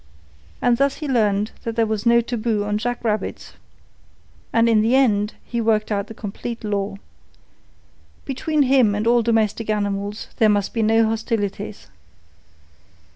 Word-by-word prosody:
And 245 Hz, -1 st, +3 dB
thus 275 Hz, +1 st, +2 dB
he 300 Hz, -, -6 dB
learned 210 Hz, -5 st, +1 dB
that 230 Hz, -1 st, -4 dB
there 230 Hz, -1 st, +2 dB
was 220 Hz, 0 st, -2 dB
no 235 Hz, 0 st, +5 dB
taboo 230 Hz, -3 st, -1 dB
on 210 Hz, 0 st, -1 dB
jackrabbits. 230 Hz, -2 st, -3 dB, 1.0 s
In 230 Hz, -1 st, +4 dB
the 230 Hz, +4 st, +2 dB
end 210 Hz, -6 st, +2 dB
he 235 Hz, -1 st, -2 dB
worked 215 Hz, -1 st, +1 dB
out 200 Hz, -1 st, -1 dB
the 225 Hz, -, -10 dB
complete 225 Hz, +3 st, -6 dB
law. 200 Hz, -1 st, -2 dB, 1.3 s
Between 290 Hz, +2 st, 0 dB
him 255 Hz, -6 st, +3 dB
and 210 Hz, +1 st, -2 dB
all 240 Hz, +1 st, +4 dB
domestic 225 Hz, -1 st, 0 dB
animals 205 Hz, 0 st, -2 dB
there 220 Hz, -, +4 dB
must 205 Hz, -1 st, 0 dB
be 230 Hz, -, 0 dB
no 225 Hz, +1 st, +3 dB
hostilities. 220 Hz, -2 st, -3 dB
225 Hz, 140 wpm, -21 LUFS, 210-235 Hz, 1.3 s, no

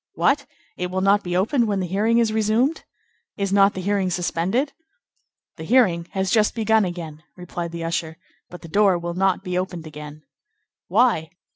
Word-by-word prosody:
"What! 280 Hz, 0 st, +1 dB, 0.3 s
It 180 Hz, 0 st, -3 dB
will 190 Hz, +1 st, -2 dB
not 200 Hz, +2 st, +4 dB
be 175 Hz, -1 st, -2 dB
opened 230 Hz, +5 st, +1 dB
when 200 Hz, -2 st, 0 dB
the 185 Hz, -, -1 dB
hearing 210 Hz, +6 st, +1 dB
is 230 Hz, -2 st, +2 dB
resumed? 220 Hz, +8 st, +1 dB, 0.5 s
Is 195 Hz, -2 st, -1 dB
not 200 Hz, 0 st, +4 dB
the 185 Hz, -, -4 dB
hearing 195 Hz, 0 st, 0 dB
suspended?" 180 Hz, -, -1 dB, 0.8 s
"The 160 Hz, -, -7 dB
hearing 180 Hz, -5 st, +3 dB
has 190 Hz, -1 st, -1 dB
just 215 Hz, 0 st, +2 dB
been 230 Hz, -, -3 dB
begun 220 Hz, -1 st, +3 dB
again," 165 Hz, -4 st, -6 dB, 0.2 s
replied 175 Hz, -1 st, -6 dB
the 170 Hz, 0 st, -5 dB
usher, 165 Hz, -1 st, -3 dB, 0.3 s
"but 175 Hz, -, -11 dB
the -, -, -8 dB
door 195 Hz, +1 st, +3 dB
will 170 Hz, 0 st, -4 dB
not 190 Hz, +1 st, +1 dB
be 180 Hz, -2 st, -1 dB
opened 180 Hz, -3 st, -5 dB
again." 150 Hz, 0 st, -10 dB, 0.6 s
"Why?" 200 Hz, -6 st, +2 dB
190 Hz, 180 wpm, -22 LUFS, 170-215 Hz, 0.8 s, not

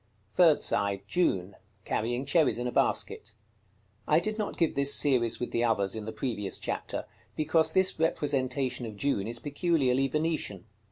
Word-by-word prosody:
Third 165 Hz, 0 st, +4 dB
side. 100 Hz, -1 st, -1 dB
June. 100 Hz, -, 0 dB, 0.3 s
Carrying 120 Hz, +4 st, -1 dB
cherries 150 Hz, -1 st, +2 dB
in 120 Hz, -, -3 dB
a 125 Hz, -, -1 dB
basket. 110 Hz, -2 st, -1 dB, 0.7 s
I 155 Hz, -, +5 dB
did 215 Hz, +4 st, -3 dB
not 210 Hz, -, -3 dB
give 165 Hz, -3 st, +2 dB
this 140 Hz, 0 st, +3 dB
series 125 Hz, -5 st, +2 dB
with 125 Hz, -, -4 dB
the 115 Hz, -, 0 dB
others 100 Hz, -4 st, +1 dB
in 110 Hz, -1 st, -5 dB
the 110 Hz, -, -4 dB
previous 110 Hz, -4 st, -4 dB
chapter, -, -, -4 dB, 0.3 s
because 160 Hz, +1 st, +2 dB
this 190 Hz, -2 st, +2 dB
representation 130 Hz, -5 st, 0 dB
of 105 Hz, -2 st, -9 dB
June 110 Hz, -6 st, 0 dB
is 120 Hz, +1 st, -4 dB
peculiarly 135 Hz, -1 st, +1 dB
Venetian. 150 Hz, -, -2 dB
130 Hz, 160 wpm, -29 LUFS, 110-155 Hz, 0.7 s, I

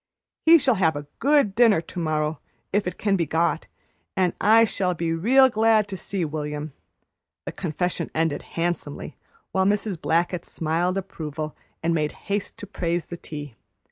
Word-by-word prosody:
"He 335 Hz, +1 st, +10 dB
shall 275 Hz, -4 st, +3 dB
have 160 Hz, -3 st, +3 dB
a 145 Hz, 0 st, -5 dB
good 280 Hz, -8 st, +3 dB
dinner 225 Hz, -5 st, +5 dB
to 170 Hz, +2 st, -7 dB
morrow, 155 Hz, -2 st, -1 dB, 0.3 s
if 205 Hz, -1 st, +1 dB
it 180 Hz, -, -4 dB
can 200 Hz, -2 st, +1 dB
be 170 Hz, -4 st, 0 dB
got, 165 Hz, +3 st, 0 dB, 0.5 s
and 185 Hz, -2 st, +2 dB
I 225 Hz, +2 st, +6 dB
shall 185 Hz, -4 st, 0 dB
be 165 Hz, 0 st, -1 dB
real 255 Hz, +11 st, +5 dB
glad 220 Hz, -3 st, +3 dB
to 195 Hz, -, -4 dB
see 190 Hz, -1 st, -3 dB
William," 150 Hz, -1 st, -4 dB, 0.7 s
the -, -, -4 dB
confession 175 Hz, 0 st, -2 dB
ended 160 Hz, -1 st, 0 dB, 0.2 s
handsomely, 175 Hz, +1 st, -3 dB, 0.4 s
while 190 Hz, 0 st, +2 dB
Mrs. 200 Hz, -3 st, 0 dB
Blackett 170 Hz, +1 st, +1 dB
smiled 170 Hz, +4 st, -1 dB
approval 155 Hz, -5 st, -5 dB, 0.3 s
and 165 Hz, 0 st, +2 dB
made 150 Hz, -2 st, 0 dB, 0.2 s
haste 205 Hz, 0 st, -2 dB
to -, -, -7 dB
praise 175 Hz, -4 st, -2 dB
the 175 Hz, -, -5 dB
tea. 145 Hz, -5 st, -8 dB
175 Hz, 165 wpm, -24 LUFS, 160-205 Hz, 0.7 s, He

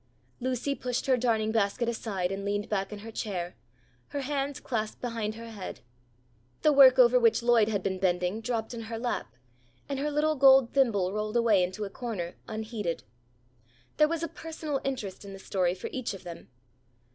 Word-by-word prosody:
Lucy 255 Hz, +2 st, -1 dB
pushed 250 Hz, -3 st, -3 dB
her 265 Hz, -, +4 dB
darning 225 Hz, -3 st, +1 dB
basket 220 Hz, +2 st, +1 dB
aside 200 Hz, -6 st, -2 dB
and 195 Hz, 0 st, -4 dB
leaned 205 Hz, +1 st, -1 dB
back 195 Hz, -1 st, -1 dB
in 210 Hz, -, -6 dB
her 225 Hz, -, -7 dB
chair, 180 Hz, -5 st, -4 dB, 0.5 s
her 285 Hz, -, -4 dB
hands 280 Hz, +1 st, -2 dB
clasped 220 Hz, -6 st, -3 dB
behind 225 Hz, -3 st, -3 dB
her 230 Hz, 0 st, -9 dB
head. 200 Hz, -4 st, -7 dB, 0.8 s
The 305 Hz, -, +6 dB
work 265 Hz, -2 st, +8 dB
over 250 Hz, 0 st, +7 dB
which 230 Hz, -1 st, +3 dB
Lloyd 235 Hz, -3 st, +5 dB
had 200 Hz, -4 st, -1 dB
been 190 Hz, -1 st, -1 dB
bending, 180 Hz, +3 st, 0 dB
dropped 225 Hz, 0 st, -2 dB
in 235 Hz, -, -5 dB
her 225 Hz, -, -3 dB
lap 225 Hz, -, -3 dB, 0.5 s
and 275 Hz, -1 st, -3 dB
her 295 Hz, +2 st, 0 dB
little 300 Hz, +1 st, +1 dB
gold 265 Hz, -3 st, +6 dB
thimble 205 Hz, -9 st, +2 dB
rolled 215 Hz, +2 st, -1 dB
away 225 Hz, -5 st, +4 dB
into 185 Hz, +4 st, -2 dB
a -, -, -6 dB
corner 195 Hz, -8 st, -4 dB
unheeded. 215 Hz, -5 st, -4 dB, 0.9 s
There 305 Hz, -, +6 dB
was 330 Hz, +1 st, -2 dB
a -, -, 0 dB
personal 315 Hz, -3 st, -5 dB
interest 235 Hz, -9 st, -4 dB
in 200 Hz, -1 st, -9 dB
the -, -, -8 dB
story 185 Hz, -2 st, 0 dB
for 185 Hz, -, -9 dB
each 255 Hz, -6 st, -3 dB
of 190 Hz, -, -12 dB
them. 170 Hz, -1 st, -9 dB
225 Hz, 185 wpm, -29 LUFS, 200-260 Hz, 0.9 s, work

